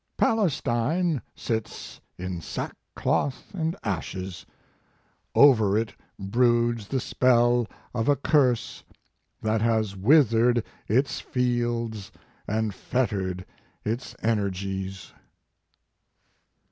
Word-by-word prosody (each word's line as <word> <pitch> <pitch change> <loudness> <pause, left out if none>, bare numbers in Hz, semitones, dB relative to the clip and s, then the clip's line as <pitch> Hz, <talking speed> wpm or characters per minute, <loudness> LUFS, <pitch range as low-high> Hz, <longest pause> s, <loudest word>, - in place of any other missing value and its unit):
" - - -48
Palestine 160 - +1
sits 110 -2 -4 0.2
in 90 -1 -4
sackcloth 135 - -3
and 165 -2 -1
ashes. 95 -2 -4 0.9
Over 110 -8 +6
it 110 0 -1 0.2
broods 120 +1 +1
the 135 - -1
spell 120 -1 +3 0.3
of 115 +2 0
a 145 - +5
curse 135 -4 +1 0.6
that 110 0 +1
has 110 -3 +1
withered 120 0 +4 0.2
its 130 +6 +1
fields 120 -4 -1 0.4
and 110 0 -1
fettered 95 -7 -2 0.4
its 115 +4 -3
energies." 95 -3 -2
115 Hz, 85 wpm, -26 LUFS, 100-125 Hz, 0.9 s, Over